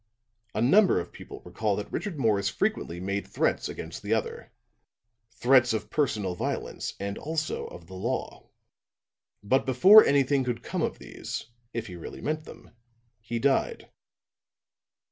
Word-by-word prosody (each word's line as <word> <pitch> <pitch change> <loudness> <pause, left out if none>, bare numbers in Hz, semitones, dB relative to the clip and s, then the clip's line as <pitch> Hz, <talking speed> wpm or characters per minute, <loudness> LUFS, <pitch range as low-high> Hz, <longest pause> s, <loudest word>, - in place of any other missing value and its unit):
A 110 - +1
number 190 - +5
of 85 - -6
people - - -11
recall 100 +3 -1
that 105 - -6
Richard 180 -2 -3
Morris 105 -6 +2
frequently 85 +1 -2
made 100 +2 -3
threats - - 0
against - - -7
the - - +1
other - - -4 0.8
threats 120 0 +4
of 110 - -3
personal 110 -11 0
violence 90 - -4
and 100 0 -4
also 160 +1 -3
of 85 - -11
the 95 - -13
law. 95 - -4 0.9
But 130 +6 +2
before 190 - +8
anything 140 -1 +3
could 125 -2 -3
come - - -3
of - - -1
these, 115 - -7 0.2
if 115 -1 -4
he 90 -2 -8
really 85 - -8
meant 155 +1 -3
them, - - -13 0.5
he 115 +2 -4
died. 135 +3 0
115 Hz, 145 wpm, -27 LUFS, 100-140 Hz, 0.9 s, before